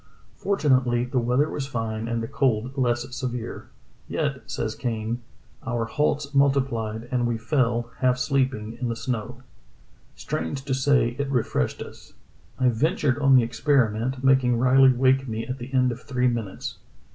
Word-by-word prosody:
Fort 200 Hz, 0 st, -2 dB
unately 125 Hz, -3 st, +3 dB
the 130 Hz, -, +2 dB
weather 125 Hz, +5 st, +2 dB
was 140 Hz, -3 st, -4 dB
fine 115 Hz, -3 st, -3 dB
and 115 Hz, 0 st, -2 dB
the -, -, -3 dB
cold 125 Hz, 0 st, 0 dB
less 120 Hz, -2 st, 0 dB
severe. 125 Hz, -3 st, -5 dB, 0.4 s
Yet, -, -, -2 dB
says -, -, -3 dB
Kane, 115 Hz, 0 st, -3 dB, 0.4 s
"Our 120 Hz, -4 st, -1 dB
halts 145 Hz, +2 st, -1 dB
multiplied, 130 Hz, -5 st, +1 dB
and 125 Hz, -2 st, +1 dB
we 120 Hz, -1 st, -1 dB
fell, 120 Hz, -1 st, 0 dB
half 125 Hz, -1 st, +2 dB
sleeping, 130 Hz, -5 st, -1 dB
in 125 Hz, -, -1 dB
the 115 Hz, -, -2 dB
snow. 125 Hz, +1 st, -4 dB, 0.7 s
Strange 105 Hz, +12 st, -4 dB
to 135 Hz, -, -1 dB
say, 130 Hz, -3 st, +2 dB
it 140 Hz, -1 st, -1 dB
refreshed 115 Hz, -, -1 dB
us. -, -, -14 dB, 0.4 s
I 130 Hz, -1 st, +3 dB
ventured 140 Hz, +2 st, +1 dB
on 135 Hz, -2 st, +5 dB
the 125 Hz, -, +6 dB
experiment, 125 Hz, 0 st, 0 dB
making 130 Hz, -3 st, +4 dB
Riley 130 Hz, +2 st, +6 dB
wake 130 Hz, +1 st, +2 dB
me 115 Hz, 0 st, -3 dB
at 130 Hz, +1 st, -5 dB
the 125 Hz, +2 st, -8 dB
end 130 Hz, -2 st, +3 dB
of 120 Hz, -, -7 dB
three 125 Hz, -2 st, 0 dB
minutes. 115 Hz, -5 st, -4 dB
125 Hz, 160 wpm, -25 LUFS, 115-135 Hz, 0.7 s, the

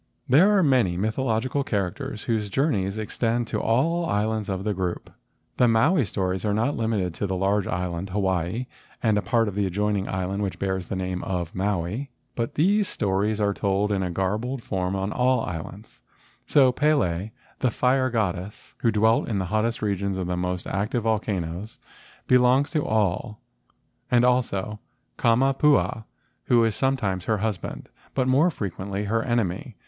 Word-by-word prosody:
There 155 Hz, +11 st, +6 dB
are 190 Hz, -, +4 dB
many 125 Hz, -, +3 dB
mythological 115 Hz, +5 st, 0 dB
characters 100 Hz, -1 st, -3 dB
whose 110 Hz, -3 st, -1 dB
journeys 100 Hz, -5 st, 0 dB
extend 115 Hz, +2 st, -1 dB
to -, -, -1 dB
all 160 Hz, +10 st, +2 dB
the 170 Hz, -, -2 dB
islands 105 Hz, +1 st, 0 dB
of 95 Hz, -1 st, -2 dB
the 105 Hz, 0 st, 0 dB
group. 90 Hz, -2 st, -3 dB, 0.5 s
The 125 Hz, -, +5 dB
Maui 130 Hz, +6 st, +3 dB
stories 95 Hz, -2 st, -2 dB
are 105 Hz, -1 st, +1 dB
not 115 Hz, +7 st, +1 dB
limited 105 Hz, -6 st, -1 dB
to 100 Hz, -, -3 dB
the 95 Hz, -, -2 dB
large 100 Hz, +1 st, +1 dB
island 90 Hz, +1 st, -3 dB
Hawaii 95 Hz, +3 st, -1 dB, 0.4 s
and 110 Hz, -3 st, +3 dB
a 105 Hz, -, +2 dB
part 115 Hz, 0 st, +1 dB
of 105 Hz, -, -3 dB
the 100 Hz, 0 st, 0 dB
adjoining 100 Hz, +1 st, -1 dB
island 95 Hz, +2 st, -2 dB
which 100 Hz, -2 st, -2 dB
bears 95 Hz, -2 st, -2 dB
the -, -, -3 dB
name 90 Hz, -1 st, -3 dB
of 90 Hz, -3 st, -3 dB
Maui, 100 Hz, +6 st, -2 dB, 0.2 s
but 115 Hz, -1 st, -3 dB
these 200 Hz, +6 st, +3 dB
stories 105 Hz, +1 st, 0 dB
are 100 Hz, -1 st, +2 dB
told 100 Hz, +1 st, 0 dB
in 100 Hz, -2 st, +1 dB
a 90 Hz, -, -1 dB
garbled 110 Hz, +8 st, -2 dB
form 95 Hz, -1 st, -2 dB
on 95 Hz, +2 st, -2 dB
all 125 Hz, -1 st, +2 dB
the -, -, -3 dB
islands. 90 Hz, -, -9 dB, 0.5 s
So 135 Hz, -3 st, +5 dB
Pele, 120 Hz, -, +1 dB, 0.3 s
the 130 Hz, -, +2 dB
fire 130 Hz, +3 st, +2 dB
goddess, 100 Hz, -4 st, -3 dB
who 115 Hz, -, +2 dB
dwelt 110 Hz, +1 st, +3 dB
in 105 Hz, -, 0 dB
the 95 Hz, -, -1 dB
hottest 110 Hz, +1 st, 0 dB
regions 100 Hz, -2 st, -1 dB
of 95 Hz, -, -2 dB
the 90 Hz, 0 st, -2 dB
most 90 Hz, 0 st, -2 dB
active 105 Hz, +5 st, -1 dB
volcanoes, 105 Hz, -3 st, -2 dB, 0.5 s
belongs 125 Hz, +2 st, +4 dB
to 150 Hz, -3 st, 0 dB
all, 105 Hz, +1 st, 0 dB, 0.7 s
and 120 Hz, 0 st, +4 dB
also 110 Hz, -5 st, 0 dB, 0.4 s
Kamapuaa, 125 Hz, -3 st, +3 dB, 0.4 s
who 120 Hz, -1 st, +4 dB
is 110 Hz, -2 st, 0 dB
sometimes 110 Hz, -9 st, 0 dB
her 110 Hz, -, +1 dB
husband, 105 Hz, -4 st, -4 dB, 0.3 s
but 130 Hz, -1 st, +1 dB
more 140 Hz, +7 st, +4 dB
frequently 100 Hz, -, -4 dB
her 110 Hz, +2 st, 0 dB
enemy. 115 Hz, -, -1 dB
105 Hz, 170 wpm, -25 LUFS, 95-120 Hz, 0.7 s, There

